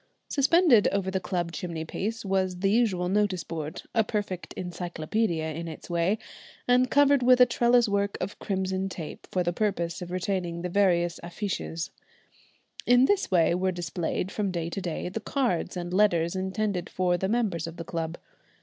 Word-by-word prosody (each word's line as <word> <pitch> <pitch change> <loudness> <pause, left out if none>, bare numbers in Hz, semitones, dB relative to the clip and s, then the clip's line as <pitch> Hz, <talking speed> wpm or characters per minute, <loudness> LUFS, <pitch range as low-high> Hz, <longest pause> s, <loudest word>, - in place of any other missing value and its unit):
Suspended 285 - +5
over 195 -1 0
the 190 - 0
club 175 -2 -2
chimney 165 -2 -4
piece 215 +7 -4
was 190 -2 0
the 195 0 +3
usual 205 -6 +2
notice 195 -2 +1
board, 155 -2 -5
a 225 - +4
perfect 205 -4 -3
encyclopædia 175 -1 -2
in 170 +1 -5
its 160 +2 -8
way, 170 +5 +2 0.5
and 250 +1 +4
covered 285 0 +5
with 250 0 +5
a 250 - +9
trellis 240 0 +3
work 200 0 0
of 205 - -5
crimson 190 -1 -1
tape 165 -4 -8
for 180 - +1
the 175 0 -1
purpose 180 -5 -1
of 175 - -6
retaining 180 -2 -2
the 180 - -2
various 175 -3 +2
affiches. 170 -2 -4 1.0
In 245 +1 +6
this 400 +5 +1
way 170 -3 +4
were 185 +1 +1
displayed, 175 +1 -3
from 205 -2 -1
day 170 -2 -3
to 195 - -3
day, 175 -2 -3
the 190 +5 -4
cards 230 - -1
and 175 0 -4
letters 175 -4 +3
intended 190 -1 -2
for 180 -1 +1
the 190 +2 -1
members 205 -8 0
of 165 +1 -8
the 165 - -6
club. 165 0 -3
185 Hz, 175 wpm, -27 LUFS, 170-210 Hz, 1.0 s, a